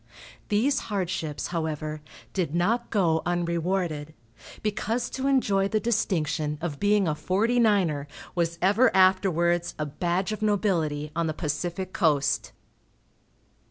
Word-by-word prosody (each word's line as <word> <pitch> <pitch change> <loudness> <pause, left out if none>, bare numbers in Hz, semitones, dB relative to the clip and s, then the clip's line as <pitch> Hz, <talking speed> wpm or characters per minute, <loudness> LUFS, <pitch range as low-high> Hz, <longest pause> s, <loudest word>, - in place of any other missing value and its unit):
These 235 +7 +2
hardships, 180 -6 -2
however, 155 -2 -3 0.3
did 170 -5 -1
not 225 +8 +1
go 170 -7 +2
unrewarded, 170 -2 -1 0.5
because 220 +3 -1
to 265 +1 -2
enjoy 205 -8 +2
the 215 +2 0
distinction 165 -9 0
of 155 -4 -4
being 205 -2 +3
a 155 - +1
"Forty 215 +10 +1
niner" 185 -11 +2 0.3
was 170 -2 -1
ever 210 +7 +5
afterwards 175 -2 +3
a 150 - -2
badge 175 +6 -1
of 215 - -4
nobility 170 -8 0
on 170 -1 0
the 155 - -2
Pacific 175 +5 -3
Coast. 150 -5 +1
175 Hz, 125 wpm, -26 LUFS, 160-205 Hz, 0.5 s, ever